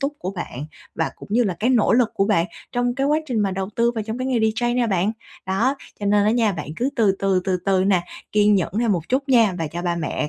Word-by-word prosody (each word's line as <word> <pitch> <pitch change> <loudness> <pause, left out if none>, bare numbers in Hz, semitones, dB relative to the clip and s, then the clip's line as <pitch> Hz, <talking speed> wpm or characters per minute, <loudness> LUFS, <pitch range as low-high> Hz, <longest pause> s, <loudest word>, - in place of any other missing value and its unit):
túc 280 +1 -1
của 185 - -4
bạn, 150 -7 -6 0.3
và - - -1
cũng - - -12
như 245 - +4
là 190 - -1
cái 245 +4 +1
nỗ 235 -5 +3
lực 240 -1 +3
của 195 - +2
bạn 185 -5 +2 0.3
trong 245 0 0
cái 275 +1 0
quá 300 +2 +3
trình 245 -6 -1
mà 200 -2 +1
đầu 190 0 -3
tư 235 0 +3
vào 225 -2 -3
trong 220 +3 -5
cái 255 - -2
nghề 260 -2 +1
DJ 225 +2 +1
nè 245 -2 +2
bạn. 195 +1 +1 0.3
Đó, 225 +9 +1 0.3
cho 205 - -2
nên 205 0 +3
á 215 - +3
nha 225 -3 +2
bạn 150 -5 -6
cứ 250 - 0
từ 210 -4 +4
từ, 195 -2 +1
từ 190 -2 +1
từ 190 -1 +3
nè, 190 -3 +3 0.3
kiên 210 0 +4
nhẫn 185 -3 0
thêm 230 -2 +2
một 170 -4 -3
chút 275 +2 0
nha, 230 -6 +4
và 165 - -2
cho 170 +3 -5
ba 175 -1 -1
mẹ 155 -2 -2
210 Hz, 280 wpm, -22 LUFS, 190-240 Hz, 0.3 s, như